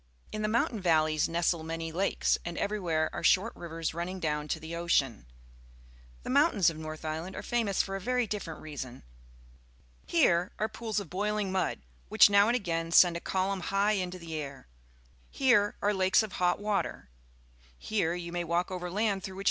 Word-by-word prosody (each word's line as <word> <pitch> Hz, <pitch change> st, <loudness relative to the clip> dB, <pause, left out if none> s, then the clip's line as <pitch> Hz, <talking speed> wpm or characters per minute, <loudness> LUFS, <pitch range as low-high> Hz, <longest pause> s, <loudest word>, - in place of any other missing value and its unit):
In 215 Hz, -, -4 dB
the 215 Hz, -, 0 dB
mountain 225 Hz, 0 st, 0 dB
valleys 155 Hz, -3 st, +2 dB
nestle 170 Hz, 0 st, +1 dB
many 165 Hz, 0 st, -4 dB
lakes, 190 Hz, +4 st, +1 dB
and 170 Hz, 0 st, -5 dB
everywhere 175 Hz, -7 st, -1 dB
are -, -, -4 dB
short 210 Hz, +5 st, +3 dB
rivers 165 Hz, -2 st, -4 dB
running 175 Hz, +3 st, -4 dB
down 150 Hz, -2 st, -2 dB
to 160 Hz, -, -2 dB
the 160 Hz, +1 st, -7 dB
ocean. 140 Hz, -, 0 dB, 1.0 s
The -, -, -6 dB
mountains 255 Hz, -, +4 dB
of 155 Hz, -, -10 dB
North 155 Hz, 0 st, -7 dB
Island 160 Hz, +4 st, -4 dB
are -, -, -6 dB
fa 240 Hz, -1 st, 0 dB
mous 200 Hz, -3 st, +1 dB
for 195 Hz, -, -5 dB
a 195 Hz, -, -4 dB
very 250 Hz, +3 st, +1 dB
different 195 Hz, -7 st, -5 dB
reason. 135 Hz, -5 st, -7 dB, 1.0 s
Here 170 Hz, +2 st, +2 dB
are 215 Hz, -, 0 dB
pools 220 Hz, -1 st, -3 dB
of 195 Hz, -6 st, -9 dB
bpilingjnud, 195 Hz, -, -1 dB, 0.3 s
which -, -, +6 dB
now 200 Hz, +1 st, +6 dB
and 240 Hz, -, +2 dB
again 165 Hz, -7 st, -2 dB
send 175 Hz, 0 st, +6 dB
a -, -, -2 dB
columnhigrrinto 190 Hz, 0 st, -1 dB
the 165 Hz, -1 st, -8 dB
air; 140 Hz, -4 st, -6 dB, 0.6 s
here 240 Hz, -7 st, +3 dB
are 205 Hz, +1 st, +3 dB
lakes 190 Hz, +2 st, +3 dB
of 215 Hz, -, -6 dB
hot 180 Hz, -1 st, +1 dB
water; 205 Hz, -, -2 dB, 0.7 s
here 175 Hz, -, -1 dB
you 170 Hz, -1 st, -6 dB
may 175 Hz, 0 st, -2 dB
walk 170 Hz, +2 st, -1 dB
over 180 Hz, -1 st, -4 dB
land 200 Hz, 0 st, 0 dB
through 190 Hz, -, -6 dB
which -, -, -8 dB
180 Hz, 180 wpm, -30 LUFS, 165-205 Hz, 1.0 s, which